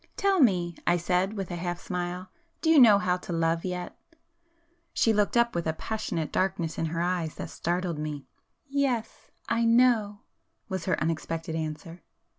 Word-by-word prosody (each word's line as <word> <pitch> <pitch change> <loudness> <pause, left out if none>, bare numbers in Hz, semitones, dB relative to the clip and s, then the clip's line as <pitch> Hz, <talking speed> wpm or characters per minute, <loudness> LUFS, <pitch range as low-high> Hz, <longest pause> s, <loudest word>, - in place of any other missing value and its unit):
"Tell 395 -2 +2
me," 180 - +3
I 175 - +4
said 180 +3 0
with 195 -4 -5
a - - -3
half 175 0 -3
smile—"Do 185 - -4
you 315 - +7
know 220 -5 +8
how 180 -2 +1
to 180 - -9
love 165 0 0
yet?" 180 -1 -4 1.0
She 225 - +3
looked 210 +2 +1
up 235 0 +3
with 170 -1 -2
a 160 - +1
passionate 165 -4 -3
darkness 185 -4 -1
in 165 - 0
her 165 +1 -2
eyes 175 -3 -1
that - - -6
startled 175 -2 -2
me. 150 -2 -5 0.4
"Yes,—I 245 -3 -2
know!" 230 -3 +3 0.5
was 190 -3 -4
her 185 - +1
unexpected 165 0 -2
answer. 160 +2 -5
180 Hz, 160 wpm, -27 LUFS, 165-220 Hz, 1.0 s, know